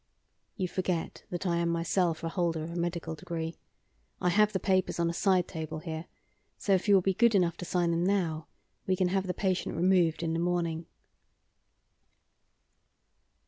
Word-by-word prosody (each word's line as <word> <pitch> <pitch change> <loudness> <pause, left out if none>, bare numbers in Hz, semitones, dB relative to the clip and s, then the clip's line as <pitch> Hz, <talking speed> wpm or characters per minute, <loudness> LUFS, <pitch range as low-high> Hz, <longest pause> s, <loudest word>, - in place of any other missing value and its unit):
"You 185 -3 0
forget 180 -2 -3
that 175 +2 -4
I 170 -2 +1
am 170 0 +1
myself 170 0 0
a 165 - -1
holder 165 -2 -1
of 165 - -6
a - - -7
medical 170 -1 -2
degree. 165 0 -4 0.7
I 180 - +2
have 210 +4 +4
the 190 - -1
papers 185 -1 +1
on 170 0 +2
a - - -6
side 185 -1 +2
table 160 -2 -5
here, 160 0 -5 0.5
so 200 - +1
if 190 +2 +1
you 205 - +7
will 190 - +4
be 195 - +2
good 235 +2 +4
enough 175 -3 +3
to 180 - -6
sign 175 -1 +1
them 170 +1 +1
now, 175 -5 0 0.4
we 190 - +3
can 185 -1 +1
have 190 0 0
the 180 - -1
patient 185 -2 -1
removed 175 -1 +3
in 165 -1 0
the 165 - 0
morning." 170 -2 -1
175 Hz, 185 wpm, -30 LUFS, 165-185 Hz, 0.7 s, you